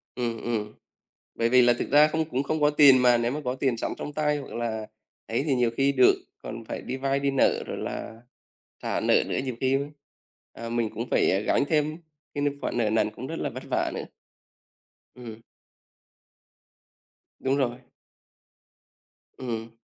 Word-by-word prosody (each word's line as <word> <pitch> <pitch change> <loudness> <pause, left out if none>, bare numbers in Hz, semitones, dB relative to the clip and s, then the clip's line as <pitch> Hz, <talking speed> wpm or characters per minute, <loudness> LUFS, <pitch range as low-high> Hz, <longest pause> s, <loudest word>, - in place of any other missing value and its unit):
Ừm, 115 -2 -2
ừm. 110 -3 -2 0.6
Bởi 115 - +1
vì 125 +1 +6
là 120 0 +5
thực - - -3
ra 150 +2 +7
không 160 +1 0
cũng 130 0 0
không 155 +2 -2
có 150 0 +4
tiền 145 -3 +7
mà, 125 -1 +6
nếu 120 +1 0
mà 150 - -3
có 125 - -1
tiền 130 -2 0
sẵn - - -3
trong 150 - -5
tay, 150 0 0
hoặc 140 - -9
là 110 -2 -3 0.4
ấy 115 +4 -1
thì 140 - +2
nhiều 120 -2 +2
khi 135 +1 +3
được, 130 -2 +6 0.3
còn 115 +1 -7
phải - - -6
đi 130 - -4
vay 135 +1 0
đi 140 0 +1
nợ 135 - +2
rồi - - -5
là 110 - -6 0.6
trả - - -1
nợ - - +3
nữa - - -2
nhiều 130 -3 -4
khi, 130 0 +2
ưm, 140 +1 -1 0.6
à, 115 - -7
mình 115 -2 -1
cũng 115 +3 -5
phải, - - +3
à, 95 - +2
gánh 105 - +2
thêm 155 -1 +1 0.4
cái 145 - -2
n 140 0 -2
khoản - - -2
nợ 110 -3 +2
nần 110 +1 +2
cũng - - -8
rất - - -5
là - - -2
vất - - -8
vả - - +1
nữa. - - -4 1.1
Ừm. 115 -3 -9 2.0
Đúng 135 +1 +1
rồi. 120 -3 0 1.6
Ừm. 115 -2 -5
125 Hz, 190 wpm, -26 LUFS, 115-140 Hz, 2.0 s, ra